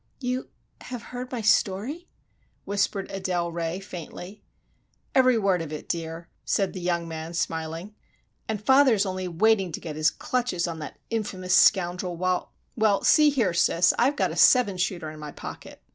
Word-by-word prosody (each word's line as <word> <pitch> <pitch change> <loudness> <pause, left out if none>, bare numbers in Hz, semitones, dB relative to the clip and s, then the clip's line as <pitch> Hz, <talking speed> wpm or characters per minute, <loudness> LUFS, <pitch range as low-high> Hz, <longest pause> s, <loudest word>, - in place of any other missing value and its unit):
"You 255 0 -3 0.4
have 245 -2 -6
heard 250 +1 -6
my 245 -3 -3
story?" 230 - +1 0.6
whispered 200 -1 -1
Adele 180 -3 -2
Ray, 170 +1 -3
faintly. 180 +1 -9 0.7
"Every 255 -2 +5
word 195 -5 +1
of 160 -2 -6
it, 155 - -7
dear," 165 0 -4 0.2
said 195 -2 0
the 185 - -6
young 170 -1 -1
man 160 +1 -6
smiling, 165 +4 -3 0.6
"and 215 -2 -1
father 265 -2 +6
is 205 0 +1
only 185 -1 -3
waiting 190 +1 +2
to - - -4
get 155 -3 -7
his 155 +1 +3
clutches 240 -9 -2
on 165 -1 -5
that 150 - -8
infamous 190 -5 -2
scoundrel, 180 -2 +3
while—well, 190 +3 -1
see 300 -1 +6
here, 235 -11 +1
sis, 175 +1 +3
I've 270 +4 +3
got - - 0
a - - -6
seven 230 -7 +5
shooter 175 -3 -2
in 155 - -11
my 150 -1 -7
pocket!" - - -10
185 Hz, 165 wpm, -26 LUFS, 170-220 Hz, 0.7 s, father